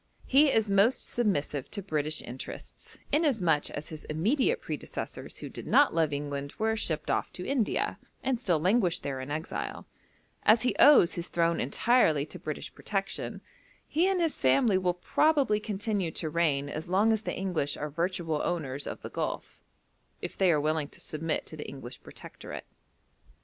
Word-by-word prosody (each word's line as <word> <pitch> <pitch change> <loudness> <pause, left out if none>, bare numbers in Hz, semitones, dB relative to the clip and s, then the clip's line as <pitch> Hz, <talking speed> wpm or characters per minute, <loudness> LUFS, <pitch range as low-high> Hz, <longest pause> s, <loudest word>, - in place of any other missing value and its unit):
He 280 +2 +5
is 220 -3 +2
most 200 +6 +3
submissive 150 - 0
to 200 - -3
British 155 -3 -1
interests, 125 +2 -9
inasmuch 220 - +2
as 150 - -6
his 155 -1 -8
immediate 255 - +1
predecessors - - -6
who - - -7
did - - -9
not 290 - +5
love 160 -2 +2
England 145 0 -4
were 220 0 +1
shipped 155 -8 -2
off - - 0
to 180 - -5
India, 260 -6 0 0.2
and 260 -3 0
still 180 -9 +2
languish 185 0 +2
there 135 -2 -4
in 130 - -7
exile; 155 +2 -4 0.6
as 220 +2 +5
he 250 - +1
owes 290 -12 +7
his 170 0 -3
throne 170 0 +1
entirely 155 - +3
to - - -10
British 155 -1 -5
protection, 195 -2 -3 0.5
he 335 +5 +2
and 385 -1 +1
his 330 -3 0
family 165 - +4
will 180 -1 0
probably 275 - +2
continue 205 -3 -2
to 160 0 -3
reign 150 -4 +1
as 155 +3 -5
long 200 +5 +3
as 220 - 0
the - - -4
English 175 -7 -1
are 150 0 -4
virtual 165 -1 -1
owners 145 -5 -2
of - - -6
the - - -5
Gulf, - - -4 0.6
if - - -6
they 185 -2 +4
are 155 - +3
willing 155 0 0
to - - -12
submit 160 +1 -3
to - - -9
the 150 - -7
English 130 -2 -9
protectorate. - - -9
175 Hz, 170 wpm, -29 LUFS, 150-220 Hz, 0.6 s, owes